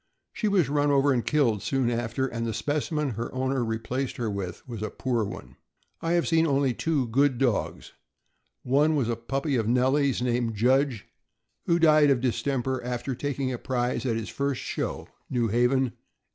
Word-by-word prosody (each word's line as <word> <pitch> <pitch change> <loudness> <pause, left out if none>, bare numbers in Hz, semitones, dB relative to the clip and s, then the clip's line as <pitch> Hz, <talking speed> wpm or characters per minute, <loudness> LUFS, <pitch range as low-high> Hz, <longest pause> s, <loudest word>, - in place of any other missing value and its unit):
She 215 - -1
was 190 -8 +3
run 145 +1 +1
over 140 0 +4
and 120 -2 0
killed 125 -9 +1
soon 130 0 0
after, 120 +2 -1
and 115 -3 -4
the 115 -1 -2
specimen 150 -1 -1
her 115 +2 -4
owner 130 0 0
replaced 115 +4 -3
her 115 -3 -2
with 95 0 -5
was 115 -4 -6
a 110 - -2
poor 120 -4 -1
one. 95 -11 -8 0.4
I 165 +1 0
have 170 -1 +1
only 140 -4 +3
seen 120 - -3
two 150 -6 0
good 135 +2 +2
dogs. 120 -4 -1 0.7
One 145 +5 +3
was 130 -6 0
a 115 - 0
puppy 135 +4 -2
of 110 -2 0
Nellie's, 130 +3 +2
named 120 -2 0
Judge, 130 +1 +2 0.6
who 170 - +4
died 155 -3 +5
of 135 -3 +3
distemper 130 +1 -1
after 125 +2 -3
taking 135 0 -2
a 120 - -5
prize 125 -2 -1
at 115 - +1
his 115 - -4
first 140 -1 -2
show, - - -4 0.2
New 120 -3 0
Haven, 125 +3 +2
1885. - - -34
130 Hz, 185 wpm, -26 LUFS, 120-140 Hz, 0.7 s, died